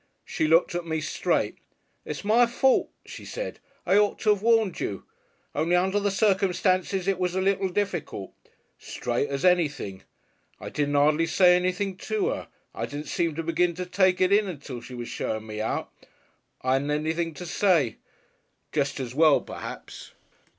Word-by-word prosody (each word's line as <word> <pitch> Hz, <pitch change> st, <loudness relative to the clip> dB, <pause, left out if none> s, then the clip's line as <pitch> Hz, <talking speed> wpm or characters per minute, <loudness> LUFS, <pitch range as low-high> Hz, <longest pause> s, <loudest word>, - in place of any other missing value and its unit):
She 155 Hz, -, -1 dB
looked 165 Hz, +3 st, +4 dB
at 175 Hz, 0 st, -2 dB
me 160 Hz, -1 st, -2 dB
straight. 155 Hz, -, -1 dB, 0.5 s
'It's -, -, -6 dB
my 235 Hz, +3 st, +5 dB
fault,' 260 Hz, +2 st, +2 dB, 0.2 s
she -, -, -10 dB
said, -, -, -6 dB, 0.3 s
'I 185 Hz, +3 st, +4 dB
ought 210 Hz, -1 st, +1 dB
to 215 Hz, -, +4 dB
'ave 205 Hz, -1 st, 0 dB
warned 225 Hz, -5 st, +3 dB
you.... 100 Hz, -, -3 dB, 0.5 s
Only 160 Hz, +4 st, +1 dB
under 190 Hz, +3 st, +2 dB
the 205 Hz, 0 st, +1 dB
circumstances 190 Hz, -2 st, +1 dB
it 195 Hz, -2 st, +1 dB
was 180 Hz, 0 st, -1 dB
a -, -, +1 dB
little 195 Hz, 0 st, +1 dB
difficult.' 175 Hz, -, -3 dB, 0.5 s
Straight 120 Hz, +4 st, -2 dB
as 140 Hz, +4 st, -2 dB
anything. 150 Hz, -, +1 dB, 0.6 s
I -, -, -7 dB
didn't 145 Hz, -1 st, -1 dB
'ardly 150 Hz, +3 st, +3 dB
say 180 Hz, 0 st, +5 dB
anything 185 Hz, +1 st, -1 dB
to 425 Hz, -, -1 dB
'er. -, -, -5 dB, 0.3 s
I -, -, -3 dB
didn't 145 Hz, +1 st, -6 dB
seem 165 Hz, -3 st, 0 dB
to 165 Hz, -, -3 dB
begin 170 Hz, +1 st, +1 dB
to 180 Hz, +1 st, -4 dB
take 185 Hz, 0 st, +2 dB
it 185 Hz, +1 st, +3 dB
in 205 Hz, 0 st, +4 dB
until 140 Hz, -8 st, -7 dB
she 125 Hz, +1 st, -10 dB
was 120 Hz, -1 st, -6 dB
showing 110 Hz, 0 st, -3 dB
me 110 Hz, -1 st, -5 dB
out. 110 Hz, -, -3 dB, 0.7 s
I 130 Hz, +1 st, +3 dB
'adn't 140 Hz, +2 st, -3 dB
anything 160 Hz, +2 st, -1 dB
to 180 Hz, -, -7 dB
say. 165 Hz, -, +2 dB, 0.7 s
Jest 140 Hz, -2 st, -1 dB
as 125 Hz, -2 st, -4 dB
well, 155 Hz, 0 st, +5 dB
perhaps. -, -, -9 dB
175 Hz, 170 wpm, -26 LUFS, 145-195 Hz, 0.7 s, my